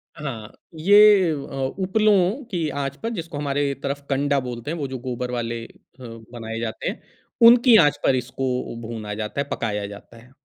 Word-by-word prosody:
हाँ। 120 -8 -7 0.3
ये 205 +1 +6
अ, - - 0 0.5
उपलों 205 +4 +2
की 170 -4 -1
आँच 140 -1 -3
पर 225 - -1
जिसको 165 -2 -6
हमारे 145 -1 -1
तरफ 140 +1 -3
कंडा 140 0 +1
बोलते 125 +1 -5
हैं 170 - -3
वो 145 -3 -3
जो 130 0 -5
गोबर 125 0 -3
वाले 115 -1 -3
अ, - - -14 0.3
बनाए 115 -1 -8
जाते 115 -1 -4
हैं, - - -7 0.5
उनकी 240 0 +7
आँच 145 - +1
पर 130 - +3
इसको 130 +1 -3 0.4
भूना 110 -3 -5
जाता 105 +6 -3
है, - - -4
पकाया 105 -3 -2
जाता 100 +3 -12
है। 120 +2 -17
135 Hz, 180 wpm, -23 LUFS, 115-165 Hz, 0.5 s, उनकी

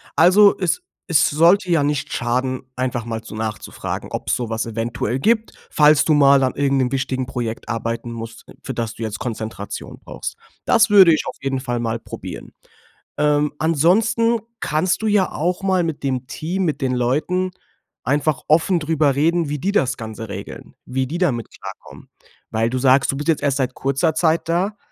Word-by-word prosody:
also 190 +6 +6
es 185 - 0 0.2
es 165 -6 +3
sollte 170 +5 +4
ja 165 -4 +3
nicht 145 0 -1
schaden, 130 +2 -1 0.2
einfach 125 -2 -2
mal 115 -1 -4
so 110 - -10
nachzufragen, 110 -1 -5
ob‘s - - -1
sowas 115 -2 -3
eventuell 115 +2 -2
gibt. 220 - +1 0.2
Falls 150 0 +5
du 155 - +3
mal 140 -2 +5
an 130 - 0
irgend 140 -1 +1
'nem 130 -2 +1
wichtigen 130 -1 -1
Projekt 120 -3 -5
arbeiten 115 +1 -3
musst, 115 0 -8 0.2
für - - -4
das 115 -1 -3
du 115 - -6
jetzt 110 -1 -4
Konzentration 110 -4 -6
brauchst. - - -7 0.3
Das 225 0 +4
würde 190 -5 +8
ich 155 - 0
auf - - -5
jeden 135 -1 -1
Fall 120 -2 -3
mal 115 0 -2
probieren. - - -9 0.6
Ähm, 150 0 +2
ansonsten 215 +10 +2 0.2
kannst 160 +7 0
du 220 - -1
ja 205 -3 +2
auch 180 +4 -2
mal 190 -2 +2
mit 160 -4 -4
dem 130 -2 -2
Team, 180 +8 -3
mit 155 -4 -1
den 130 -2 -1
Leuten 150 +10 0 0.5
einfach 145 +2 0
offen 170 +4 +3
drüber 150 -3 +1
reden, 165 +2 +1
wie 150 - -2
die 185 +8 -1
das 135 -10 +1
Ganze 110 -1 -7
regeln, - - -8
wie 130 +1 -2
die 160 +6 -4
damit 135 - 0
klarkommen, - - -11 0.4
weil 115 +1 +1
du 130 - -2
sagst, 130 +1 +4
du 135 - -5
bist 145 - -5
jetzt 160 - +2
erst 140 -2 +1
seit 130 -2 -1
kurzer 140 +6 0
Zeit 160 +1 +1
da, 185 +5 0
140 Hz, 185 wpm, -20 LUFS, 125-170 Hz, 0.6 s, würde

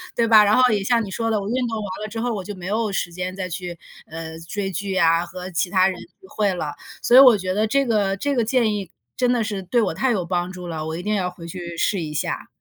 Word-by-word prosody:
对 235 - +2
吧？ 220 -2 +7
然 205 - +4
后 255 -1 +5
也 205 - +1
像 235 0 +2
你 195 - -7
说 225 +3 -1
的， 215 -2 +1
我 200 - -4
运 250 +1 0
动 225 - -3
完 210 - -4 0.2
了 215 - -3
之 225 +1 -4
后， 240 -1 -1
我 200 - -3
就 205 - -6
没 180 -2 -9
有 215 +3 0
时 175 -2 -1
间 185 +1 -4
再 185 -1 -4
去， 175 0 -5 0.3
嗯， 160 0 -7
追 195 -1 -3
剧 195 +3 -3
呀， 165 -2 +3
和 180 +1 -8
其 175 +1 0
他 185 0 +4
人 185 - -6
聚 380 +2 -16
会 205 -3 0
了， 155 -5 -4 0.3
所 245 - +5
以 - - +12
我 250 -5 +8
觉 185 -1 -2
得 215 +3 +1
这 275 +4 +2
个 205 -4 +1
这 285 +8 -1
个 235 -3 +1
建 230 -3 +2
议 195 -4 -4 0.3
真 250 -1 +2
的 235 - +1
是 205 -3 -3
对 235 +6 +1
我 200 - 0
太 255 +9 +1
有 185 -5 -1
帮 175 0 -1
助 180 -1 -8
了， 160 -2 -4
我 160 - -3
一 175 - -6
定 210 - -1
要 190 -3 0
回 175 -2 -11
去 170 0 -7
试 190 +3 0
一 155 -2 -4
下。 150 - -3
195 Hz, 310 characters per minute, -22 LUFS, 180-225 Hz, 0.3 s, 以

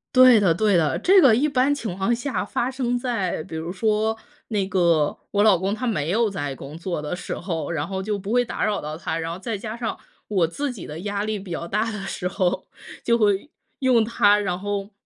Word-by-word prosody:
对 255 -3 +8
的 180 -5 +4
对 205 +3 +2
的， 155 -5 +2
这 380 +1 +6
个 265 -8 +7
一 265 +7 +3
般 275 0 +2
情 220 -10 -4
况 195 +5 +1
下 255 +4 -2
发 245 - -1
生 250 -2 -1
在 230 -10 -1
比 160 - -9
如 160 +2 -4
说， 215 +3 0 0.3
那 205 -4 0
个 170 -5 +2
我 205 - +2
老 210 -4 +6
公 190 +3 -1
他 250 +4 -3
没 165 -10 -1
有 220 +4 +2
在 145 -8 -3
工 140 +3 -9
作 170 -2 -3
的 150 +4 -3
时 - - -5
候， 170 -3 -3
然 155 -2 -2
后 190 +1 -3
就 205 0 -2
不 200 +3 -4
会 245 0 +4
打 240 - -2
扰 210 -2 0
到 155 +1 -5
他， 160 -1 -3
然 165 0 -3
后 170 - -6
再 225 +1 -3
加 215 +3 -6
上 230 -2 -3 0.3
我 190 -5 +2
自 285 - -3
己 205 - -9
的 150 +2 -7
压 200 +2 -2
力 215 -1 -2
比 190 -1 -11
较 170 0 -4
大 210 +6 0
的 215 -2 -5
时 180 - -3
候， 185 0 -1 0.4
就 235 0 +3
会 205 +4 +1 0.3
用 255 -4 +4
它， 210 -2 +4
然 185 -3 -2
后 200 +1 -3
205 Hz, 250 characters per minute, -23 LUFS, 175-230 Hz, 0.4 s, 对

